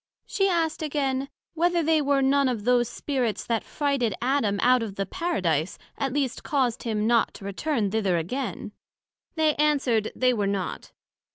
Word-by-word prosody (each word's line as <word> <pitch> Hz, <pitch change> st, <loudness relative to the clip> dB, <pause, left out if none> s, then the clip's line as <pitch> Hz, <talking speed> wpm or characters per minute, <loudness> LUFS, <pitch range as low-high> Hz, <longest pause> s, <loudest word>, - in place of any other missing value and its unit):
she 390 Hz, -1 st, +1 dB
asked 330 Hz, -3 st, 0 dB
again, 275 Hz, -3 st, -1 dB, 0.2 s
Whether 345 Hz, +1 st, +1 dB
they 315 Hz, 0 st, +3 dB
were 280 Hz, -1 st, +2 dB
none 275 Hz, 0 st, +3 dB
of 230 Hz, -5 st, -3 dB
those 240 Hz, 0 st, +2 dB
Spirits 250 Hz, -5 st, -2 dB
that 230 Hz, -2 st, -1 dB
frighted 275 Hz, -8 st, -1 dB
Adam 240 Hz, -6 st, +1 dB
out 250 Hz, 0 st, +5 dB
of 210 Hz, -4 st, -5 dB
the 195 Hz, -, -2 dB
Paradise, 185 Hz, -, -1 dB, 0.2 s
at 270 Hz, -2 st, -2 dB
least 275 Hz, -2 st, -1 dB
caused 255 Hz, -4 st, 0 dB
him 215 Hz, -3 st, -1 dB
not 235 Hz, 0 st, +2 dB
to 195 Hz, -, -10 dB
return 210 Hz, +1 st, -1 dB
thither 200 Hz, -5 st, +1 dB
again? 205 Hz, -, -4 dB, 0.6 s
They 315 Hz, -2 st, +3 dB
an? 300 Hz, 0 st, +3 dB
swered 230 Hz, -6 st, 0 dB
they 255 Hz, -1 st, +3 dB
were 205 Hz, -4 st, 0 dB
not. 195 Hz, -2 st, -3 dB
255 Hz, 170 wpm, -26 LUFS, 215-290 Hz, 0.6 s, out